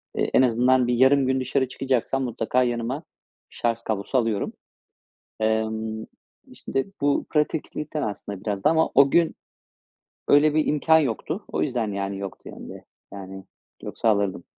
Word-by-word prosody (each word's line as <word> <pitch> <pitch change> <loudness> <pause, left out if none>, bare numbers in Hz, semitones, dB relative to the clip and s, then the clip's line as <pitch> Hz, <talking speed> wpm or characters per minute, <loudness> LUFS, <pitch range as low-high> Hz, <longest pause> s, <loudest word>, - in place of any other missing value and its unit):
eee, - - 0
en - - +6
azından 125 +1 +3
bir 120 - +1
yarım 130 +2 +4
gün 130 0 +1
dışarı 130 +1 0
çıkacaksam 135 0 -1
mutlaka 125 +1 0
yanıma 120 +4 -2 0.5
şarj 115 -1 -2
kablosu 110 +4 -1
alıyorum. 115 -4 0 0.9
Emm, 110 0 -1 0.5
işte, 135 - -3 0.2
bu 145 0 +1
pratiklikten 150 0 -2
aslında 100 -4 -5
biraz 100 -3 -3
da - - +5
ama 160 0 +2
o 140 0 +6
gün 170 -1 +3 0.9
öyle 145 +1 +5
bir 155 -1 +2
imkân 160 +2 +4
yoktu. 155 - -2
O - - -2
yüzden, 120 -7 -1
yani, 100 0 -3
yoktu 100 -1 -8
yanımda. - - -9 0.4
Yani, 95 -1 -9 0.4
yoksa 115 - -2
alırdım. 100 -4 +1
125 Hz, 145 wpm, -24 LUFS, 110-140 Hz, 0.9 s, en